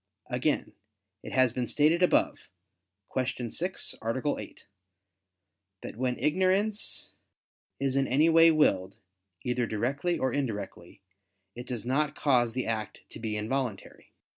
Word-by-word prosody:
Again, - - 0 0.5
it - - -8
has 130 -3 +3
been 125 -1 -2
stated 155 +4 +3
above 180 - +2 0.7
(Q. 125 -2 -2
6, 180 +3 -3
A. 130 +6 -1
8) - - -10 1.2
that - - -7
when 125 +1 -1
ignorance 190 +6 0 0.7
is 135 -1 0
in 135 -1 +2
any 150 +5 +4
way 165 0 +7
willed, 100 - +2 0.5
either 125 -1 0
directly 140 +11 -1
or 130 - 0
indirectly, 105 -9 -4 0.5
it 120 +1 -8
does 120 -2 -5
not 140 +3 +1
cause 120 -5 +2
the 130 +1 -2
act 110 -2 -3
to - - -9
be 110 -2 -3
involuntary. 110 -1 -4
130 Hz, 130 wpm, -29 LUFS, 115-150 Hz, 1.2 s, way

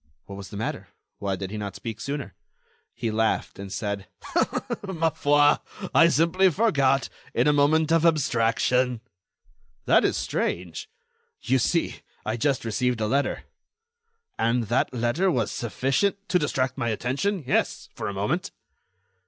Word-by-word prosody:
What 100 - -9
was 100 -1 -8
the 100 - -7
matter? 110 - -4 0.3
Why 100 -1 -1
did 95 0 -6
he 105 - -4
not 100 -2 -5
speak 115 -2 -6
sooner? 140 -7 -4 0.6
He 115 -2 -2
laughed, 110 -2 0
and 100 -1 -7
said: 100 -2 -3 0.8
"Ma 165 -4 0
foi! 145 0 +4 0.4
I 165 - +7
simply 170 +4 +3
forgot—in 140 -9 +1
a 150 - +5
moment 155 +2 +3
of 165 -1 +4
abstraction." 125 -5 +2 0.8
"That - - +5
is - - +1
strange." 85 -2 -3 0.5
"You 130 +1 +1
see, 165 +7 0 0.3
I 110 - -1
just 135 +1 0
received 125 +1 0
a 110 - 0
letter." 140 +6 0 1.0
"And 115 +1 +2
that 120 - +1
letter 125 +10 +1
was 120 - 0
sufficient—" 135 - 0
"To 180 - +3
distract 135 -3 -1
my 120 -2 0
attention? 140 - -1
Yes, - - 0
for - - -5
a 100 - -3
moment." 105 - -1
130 Hz, 145 wpm, -25 LUFS, 110-155 Hz, 1.0 s, I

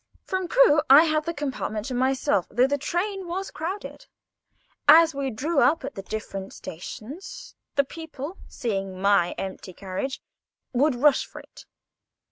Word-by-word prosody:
From 375 -2 -2
Crewe 405 -8 +5
I 280 +4 +9
had 310 -1 0
the 335 - -2
compartment 260 -7 -3
to 255 - -4
myself, 255 -7 +1
though 245 +3 +3
the 285 +1 0
train 375 +5 -2
was 380 +3 -4
crowded. 370 +6 -6 0.8
As 320 +2 +8
we 275 -1 -2
drew 280 +7 -1
up 275 +5 +3
at 275 - -5
the 195 - -6
different 195 -1 -6
stations, 300 - -9 0.2
the 280 - +4
people, 320 +2 -8
seeing 195 -5 -3
my 200 -3 +3
empty 190 -1 -6
carriage, 195 +9 -4 0.5
would 275 +2 +3
rush 280 +3 +4
for - - -10
it. - - -16
275 Hz, 150 wpm, -25 LUFS, 215-330 Hz, 0.8 s, I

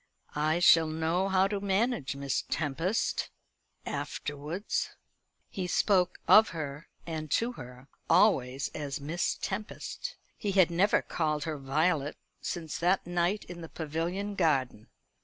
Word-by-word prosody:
I 155 +2 +1
shall 165 -2 +6
know 165 +4 0
how 190 0 +4
to 200 0 -2
manage 200 - 0
Miss 140 -1 -1
Tempest 165 - -1 0.6
afterwards." 150 +7 -3 0.6
He 185 -2 -4
spoke 185 0 +2
of 220 +1 +8
her, 150 -2 -6 0.2
and 155 -2 -4
to 230 - +1
her, 125 - -11 0.2
always 135 - +3
as 145 -1 -4
Miss 155 +5 -1
Tempest. 215 - -5 0.2
He 200 -2 -2
had 185 -3 +5
never 185 +5 +3
called 150 -1 -1
her 155 -2 -4
Violet 150 +2 0 0.2
since 160 -3 -4
that 180 +3 +2
night 175 +4 0
in 175 -1 -9
the 165 - -8
Pavilion 170 +6 -3
garden. 135 - 0
165 Hz, 130 wpm, -30 LUFS, 150-190 Hz, 0.6 s, of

